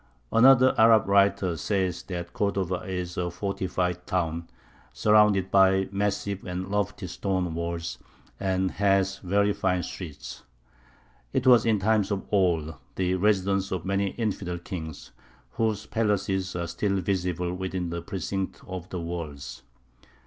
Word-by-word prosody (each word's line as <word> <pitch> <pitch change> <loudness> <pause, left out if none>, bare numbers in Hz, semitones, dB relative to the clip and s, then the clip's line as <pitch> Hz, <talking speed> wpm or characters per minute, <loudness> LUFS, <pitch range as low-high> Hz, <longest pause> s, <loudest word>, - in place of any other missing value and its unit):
Another 130 +2 +6
Arab 110 -2 +6
writer 100 -3 +3
says 95 +1 -1
that 85 -2 -6
Cordova 95 -3 0
"is 90 -1 -4
a 90 0 -1
fortified 90 -1 -2
town, 85 -2 -1 0.5
surrounded 100 - +4
by 95 0 +4
massive 100 0 -2
and 90 +1 -4
lofty 105 -1 -1
stone 90 -1 -2
walls, 85 0 -4 0.4
and 95 -1 0
has 95 -1 +1
very 100 +2 +1
fine 90 -2 0
streets. 75 -9 -8 0.9
It 130 - 0
was 120 -3 +6
in 110 -2 +4
times 105 0 +2
of 100 -2 -2
old 85 -6 +2 0.2
the 90 -1 0
residence 95 0 +1
of 95 -2 -3
many 100 +1 +1
infidel 100 -6 -2
kings, 80 -3 -7 0.4
whose 110 - -1
palaces 95 -4 -1
are 85 -1 -2
still 100 +3 -1
visible 90 -2 -1
within 90 -1 -3
the 85 0 -3
precincts 95 0 -4
of 90 -1 -7
the 90 - -4
walls. 75 -7 -6
95 Hz, 135 wpm, -26 LUFS, 90-100 Hz, 0.9 s, Another